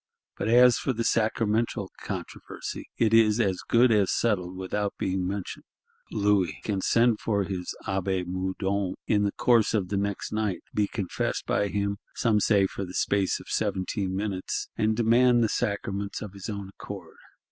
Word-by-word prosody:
But - - -3
as 120 +1 +6
for 130 - -1
the 115 0 -2
sacramental 115 0 0
controversy, - - -6
it 115 -1 +2
is 110 -1 +5
as 95 -5 +1
good 120 +1 +4
as 105 -3 +3
settled 95 -5 0
without 100 +2 -2
being 95 -1 -1
mentioned; 100 0 -5 0.4
Louis 100 -3 +1
can 100 -3 -1
send 115 +1 +3
for 100 -3 0
his 90 -2 -4
Abbé 95 -1 -1
Moudon 95 +1 -2
in 105 -2 +2
the 100 - +1
course 115 -1 +3
of 95 -3 -1
next 100 0 -2
night, 105 -4 -1
be 105 -1 +1
confessed 100 -4 -3
by 100 - +1
him, 100 0 -1 0.2
some 110 -3 +2
say 100 -2 +4
for 100 - -4
the 90 -1 -7
space 100 -2 +1
of - - -12
"seventeen 95 0 -1
minutes," 100 -2 -3
and 110 0 +1
demand 120 +1 +4
the 110 - +2
sacraments 100 -3 -2
of 105 -3 -8
his 100 +2 -7
own 100 -2 -5
accord. - - -10
100 Hz, 165 wpm, -27 LUFS, 95-110 Hz, 0.4 s, as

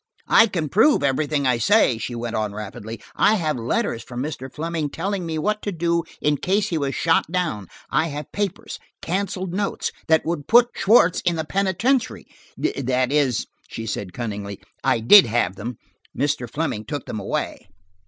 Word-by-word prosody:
"I 225 - +7
can 170 -7 -2
prove 220 - +4
everything 140 +1 0
I 125 -2 +2
say," 125 - +3
she 120 - -4
went 115 0 -4
on 105 -2 -1
rapidly. 105 +1 -7 0.2
"I 215 - +4
have 155 -6 0
letters 115 -1 -1
from 125 +1 -5
Mr. 135 -3 -6
Fleming 160 0 -3
telling 185 +3 -3
me 160 -1 -3
what 210 +6 -1
to 205 - -3
do 170 -1 0 0.2
in 145 0 +1
case 200 +7 0
he 165 - -1
was 140 -1 -2
shot 165 0 +2
down; 155 - -2 0.2
I 165 - +2
have 150 -1 -6
papers–canceled 190 -1 -4
notes–that 185 -5 0
would 160 -3 -3
put 240 +1 +6
Schwartz 195 -4 +4
in 175 - +1
the 160 -1 -3
penitentiary–that 190 - -1
is," 140 -5 +1 0.2
she 115 - -6
said 100 -3 -4
cunningly, 100 -3 -5 0.2
"I 115 - +2
did 190 - +8
have 105 -5 0
them. 110 +4 -6 0.4
Mr. 140 -4 -1
Fleming 135 -9 -3
took 145 -3 -5
them 110 - -5
away." 100 - -4
150 Hz, 165 wpm, -22 LUFS, 120-185 Hz, 0.4 s, did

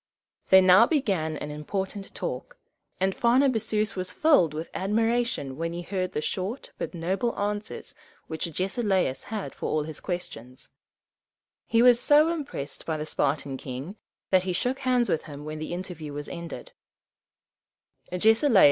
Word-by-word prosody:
They 190 0 +9
now 185 +5 +7
began 190 - 0
an 150 - -5
important 190 +6 -4
talk, - - -5 0.4
and 190 +1 +2
Pharnabazus 235 -4 +2
was 185 -1 -3
filled 285 - +4
with 155 +2 -6
admiration 225 - 0
when 165 +1 -2
he 175 +1 -5
heard 185 0 -2
the 150 - -1
short 200 - -4
but - - -4
noble 190 +8 -1
answers 205 +1 -3 0.3
which 160 +1 -3
Agesilaus 185 - 0
had 215 -2 -5
for - - -4
all 155 -1 +1
his 155 0 -7
questions. 130 - -6 1.0
He 230 +1 +4
was 245 -1 +7
so 300 +4 +5
impressed 280 - -5
by 160 -1 -2
the 150 - -4
Spartan 140 -2 -1
king, 135 +9 -6 0.4
that 185 -1 +5
he 185 0 -2
shook 250 +8 -1
hands 250 -3 +2
with 160 - 0
him 145 -2 -9
when 155 0 -5
the 155 - -5
interview 175 -4 -6
was 145 0 -5
ended. 170 -2 -7
185 Hz, 145 wpm, -27 LUFS, 155-225 Hz, 1.0 s, They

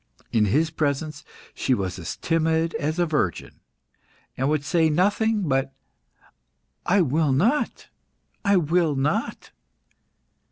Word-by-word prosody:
In 110 -2 +3
his 155 +10 +1
presence, 150 0 -2 0.3
she 130 - 0
was 95 -3 -4
as 85 -1 -6
timid 165 0 0
as 155 +2 -2
a 175 - +2
virgin, 150 - -2 0.8
and 135 +2 0
would 150 -2 0
say 160 0 +2
nothing 205 +6 +1
but 135 -1 0 1.1
"I 195 +2 +4
will 155 -1 +1
not! 215 - 0 0.6
I 200 -1 +4
will 165 -2 +1
not!" 150 - -2
155 Hz, 120 wpm, -24 LUFS, 135-175 Hz, 1.1 s, I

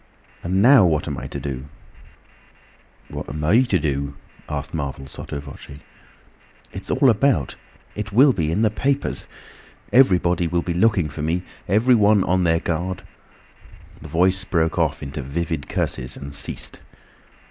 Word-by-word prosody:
And 95 +3 +1
now 130 -2 +8
what 80 -4 +1
am 70 -4 -3
I 65 - -6
to - - -6
do?" 65 -2 -5 1.4
"What - - -6
am 75 +2 -5
I 100 +11 +5
to 130 - +1
do?" 70 -1 -2 0.3
asked 75 -1 -4
Marvel, 70 -3 -4
sotto 70 +1 -7
voce. 70 0 -11 0.9
"It's - - -7
all 135 - +3
about. 115 - +1 0.4
It 105 0 -5
will 130 +6 +6
be 80 -6 -1
in 105 +7 +1
the 110 - +3
papers! 140 +5 -1 0.7
Everybody 90 -8 +4
will 85 +1 0
be 85 - -2
looking 90 -3 +2
for 75 +1 -7
me; 85 +4 -1 0.2
everyone 105 -1 +4
on 90 0 +1
their 80 -1 +3
guard—" 85 +2 -3 1.0
The 80 - -10
Voice 95 +4 +3
broke 80 -2 0
off 80 -3 0
into 70 +2 -5
vivid 75 +2 -3
curses 65 -1 -2
and 70 +1 -8
ceased. 70 - -4
85 Hz, 150 wpm, -22 LUFS, 75-100 Hz, 1.4 s, now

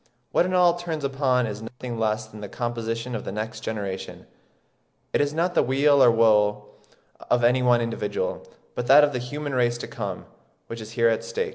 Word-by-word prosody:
What 175 - +2
it 185 - -3
all 175 -1 +5
turns 165 -4 -4
upon 135 -2 +1
is 105 -1 -5
nothing 120 +1 -7
less 110 0 0
than 110 -1 -12
the 105 - -7
composition 115 +1 -4
of 110 - -4
the - - -5
next 110 +3 -5
generation...It 100 +4 -7
is 145 0 0
not 170 +3 0
the - - +4
weal 140 +2 +3
or 125 - +7
woe 105 -2 +3 0.6
of 120 0 +2
any 125 +2 +4
one 120 -1 +3
individual, 480 - -3 0.3
but 120 - -4
that 145 +3 +8
of 145 -1 +2
the 125 - -1
human 145 +3 -5
race 120 -2 +1
to - - -7
come, - - -6 0.4
which 115 0 -8
is 110 +1 -9
here 115 0 +3
at 115 - -1
stake." 470 -1 -3
120 Hz, 200 wpm, -24 LUFS, 110-145 Hz, 0.6 s, that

